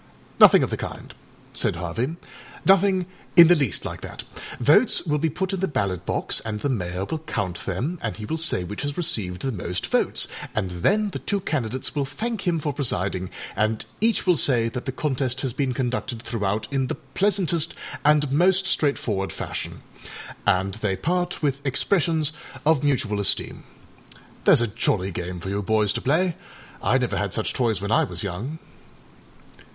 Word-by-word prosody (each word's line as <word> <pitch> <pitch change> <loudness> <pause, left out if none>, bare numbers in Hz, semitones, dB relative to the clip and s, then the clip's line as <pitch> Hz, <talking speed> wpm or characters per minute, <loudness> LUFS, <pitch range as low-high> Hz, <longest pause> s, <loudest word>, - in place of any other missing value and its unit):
âNothing - - +8
of - - -2
the - - -1
kind,â - - -7 0.4
said - - +1
Harvey, 110 - -3 0.5
ânothing 190 -1 +4 0.3
in 170 - +11
the 175 - +6
least 140 - 0
like - - -5
that. - - -7 0.4
Votes - - +5
will 150 -1 +1
be 160 +2 +1
put 190 +5 -2
in 190 - -1
the 190 - 0
ballot 100 - -2
box, - - +1
and 105 -1 -4
the 145 - 0
Mayor 90 -6 -2
will 160 +8 -3
count 100 - -3
themâand 115 - -3
he 105 +1 -7
will 160 +7 -2
say 155 - +2
which 105 +4 -6
has 145 0 -3
received 105 - -1
the 135 - 0
most 90 -4 -3
votes, - - +1 0.3
and 95 -4 -1
then 200 - +1
the - - -5
two 200 - -1
candidates 130 - -2
will 145 -2 0
thank 220 - -4
him 170 -2 +2
for 150 -2 -2
presiding, 95 -9 -1 0.3
and 110 +2 0
each 225 0 +2
will 180 -2 +4
say 120 -6 +3
that 125 +2 -6
the 130 - -2
contest 130 -2 -1
has 130 -4 -2
been 135 0 0
conducted 125 -1 -2
throughout 105 -2 -2
in 135 -1 +1
the - - -3 0.2
pleasantest 180 -5 +1 0.3
and 150 -2 +4
most 185 +5 +4
straightforward 115 - 0
fashion, - - -5 0.6
and 95 -1 +2
they 100 -3 0
part 175 0 -1
with 140 -1 0
expressions 160 +2 +1 0.3
of 155 -2 +3
mutual 115 -8 +1
esteem. 100 - 0 0.8
Thereâs 120 - +6
a - - +2
jolly 105 -3 0
game 90 +1 -5
for 95 - -6
you 100 +1 -1
boys 105 0 +2
to - - -3
play. 165 +5 +1 0.5
I 130 - +3
never 125 -2 -1
had 100 -3 -1
such 110 - -1
toys 115 -5 +1
when 100 +2 -4
I - - +4
was 90 -1 -4
young. 105 - -4
130 Hz, 180 wpm, -24 LUFS, 100-160 Hz, 0.8 s, in